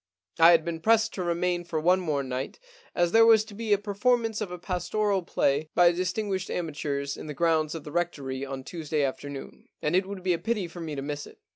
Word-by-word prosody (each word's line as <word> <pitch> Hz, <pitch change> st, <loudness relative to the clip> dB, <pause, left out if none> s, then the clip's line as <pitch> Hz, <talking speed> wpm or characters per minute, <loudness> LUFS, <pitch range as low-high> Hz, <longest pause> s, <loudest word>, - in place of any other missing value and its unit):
I 165 Hz, +1 st, +9 dB
had 170 Hz, -2 st, +5 dB
been 170 Hz, -1 st, -3 dB
pressed 225 Hz, +4 st, +3 dB
to 185 Hz, -, -3 dB
remain 175 Hz, +1 st, 0 dB
for 165 Hz, -2 st, -3 dB
one 180 Hz, +4 st, +4 dB
more 150 Hz, -6 st, -1 dB
night, 130 Hz, +1 st, -4 dB, 0.4 s
as 175 Hz, -1 st, +2 dB
there 225 Hz, 0 st, +7 dB
was 225 Hz, -1 st, +6 dB
to 220 Hz, -, -12 dB
be 220 Hz, +1 st, -4 dB
a 205 Hz, -, +6 dB
per 205 Hz, 0 st, -6 dB
formance 225 Hz, 0 st, +1 dB
of 210 Hz, -, -2 dB
a 180 Hz, -, -6 dB
pastoral 190 Hz, +3 st, -1 dB
play 150 Hz, -3 st, 0 dB
by 175 Hz, -1 st, +6 dB
distinguished 190 Hz, +2 st, -2 dB
amateurs 145 Hz, -4 st, -3 dB
in -, -, -9 dB
the 150 Hz, -, -6 dB
grounds 160 Hz, -1 st, +1 dB
of 160 Hz, -, -6 dB
the 150 Hz, -, -8 dB
Rectory 140 Hz, -6 st, -2 dB
on 135 Hz, -1 st, -5 dB
Tuesday 155 Hz, -1 st, -2 dB
afternoon, 140 Hz, +1 st, -5 dB
and 150 Hz, +3 st, 0 dB
it 185 Hz, +1 st, +2 dB
would 195 Hz, -2 st, -7 dB
be 185 Hz, -1 st, +2 dB
a 170 Hz, -, -2 dB
pity 220 Hz, -6 st, -1 dB
for 170 Hz, +1 st, -9 dB
me 155 Hz, -2 st, -4 dB
to 135 Hz, -, -4 dB
miss 145 Hz, 0 st, -5 dB
it. -, -, -16 dB
175 Hz, 235 wpm, -27 LUFS, 150-195 Hz, 0.4 s, I